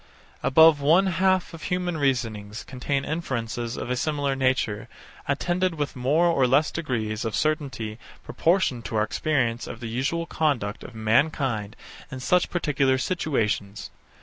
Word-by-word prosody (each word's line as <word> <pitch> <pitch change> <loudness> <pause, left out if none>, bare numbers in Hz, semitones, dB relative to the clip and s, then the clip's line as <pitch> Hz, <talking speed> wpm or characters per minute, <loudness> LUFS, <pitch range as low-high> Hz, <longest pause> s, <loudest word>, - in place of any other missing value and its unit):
Above 160 +1 +6
one 165 +7 +5
half 185 0 +1
of 165 - -9
human 180 -1 -1
reasonings 115 -7 -1
contain 135 +1 -2
inferences 120 -7 -3
of 125 - -4
a - - +1
similar 145 0 -1
nature, 130 -6 0 0.4
attended 175 +5 0
with 145 -2 -3
more 140 +7 +2
or 140 -7 +3
less 145 +5 +3
degrees 110 -9 -2
of 115 -2 -2
certainty 135 -8 -2 0.2
proportioned 165 -9 +1
to 115 - -5
our 105 - +3
experience 120 -2 -1
of 110 - -7
the 120 - -7
usual 135 +9 -1
conduct 140 -11 -1
of 125 - -10
mankind 115 -1 +1 0.3
in 130 - -7
such 180 +7 +2
particular 140 -6 +1
situations. 110 - -2
135 Hz, 145 wpm, -25 LUFS, 115-160 Hz, 0.4 s, Above